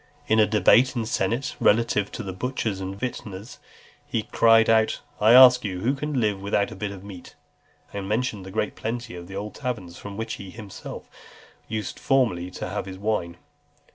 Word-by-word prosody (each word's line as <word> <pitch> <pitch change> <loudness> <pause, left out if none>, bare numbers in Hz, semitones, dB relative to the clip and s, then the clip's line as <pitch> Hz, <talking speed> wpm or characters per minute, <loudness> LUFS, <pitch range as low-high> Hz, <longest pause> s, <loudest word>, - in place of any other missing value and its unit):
In 110 - +3
a 105 - +5
debate 120 +4 +4
in 115 - -1
the - - -6
senate 120 +4 -1
relative 105 -2 +2
to 120 - -5
the 95 -2 -5
butchers 110 -2 -3
and 95 +1 -5
vintners, 105 -3 -6 0.5
he 110 - -1
cried 115 0 +4
out, 110 -1 +3 0.2
"I 110 +2 +6
ask 125 0 +9
you, 95 -3 -4
who 125 +6 +1
can 145 -1 -2
live 105 -4 0
without 100 0 0
a - - -8
bit 100 +1 -3
of 100 -1 -9
meat?" 95 -3 -11 0.6
And 100 -1 -5
mentioned 110 -3 -1
the 95 - -9
great 105 +2 -2
plenty 115 0 -4
of 85 0 -9
old 100 +2 -5
taverns, 105 -11 -5
from 100 -1 -8
which 115 0 -3
he 95 - -9
himself 100 -1 -9 0.6
used 110 -1 -4
formerly 105 -10 +1
to - - -6
have - - -4
his 95 -1 -7
wine. 95 -4 -2
105 Hz, 190 wpm, -25 LUFS, 95-115 Hz, 0.6 s, ask